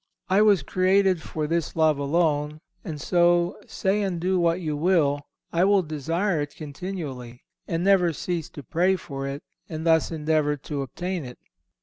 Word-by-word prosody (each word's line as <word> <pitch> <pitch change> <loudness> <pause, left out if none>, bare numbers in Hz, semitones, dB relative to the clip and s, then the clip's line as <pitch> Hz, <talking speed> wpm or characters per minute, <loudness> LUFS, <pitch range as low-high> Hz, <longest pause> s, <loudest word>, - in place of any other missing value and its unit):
I 190 +3 +4
was 205 -7 +4
created 185 +2 +2
for 155 -1 -4
this 165 +1 -1
love 155 -3 +3
alone, 150 0 0 0.2
and 160 -7 -6
so, 175 +1 +2
say 195 +2 0
and 190 -4 -1
do 185 +2 +1
what 170 0 +2
you 155 -4 -2
will, 150 -3 +2 0.3
I 170 +1 +3
will 200 -1 +4
desire 165 +3 -1
it 145 0 -5
continually, 145 -6 -7 0.2
and 165 +1 -1
never 190 -3 +4
cease 165 +1 -3
to 145 - -6
pray 180 +9 +2
for 135 -6 -6
it, 140 +1 -5 0.3
and 160 0 -5
thus 160 -1 +3
endeavour 155 -2 0
to 145 +1 -5
obtain 175 +6 -4
it." 125 -1 -9
165 Hz, 165 wpm, -25 LUFS, 150-185 Hz, 0.3 s, I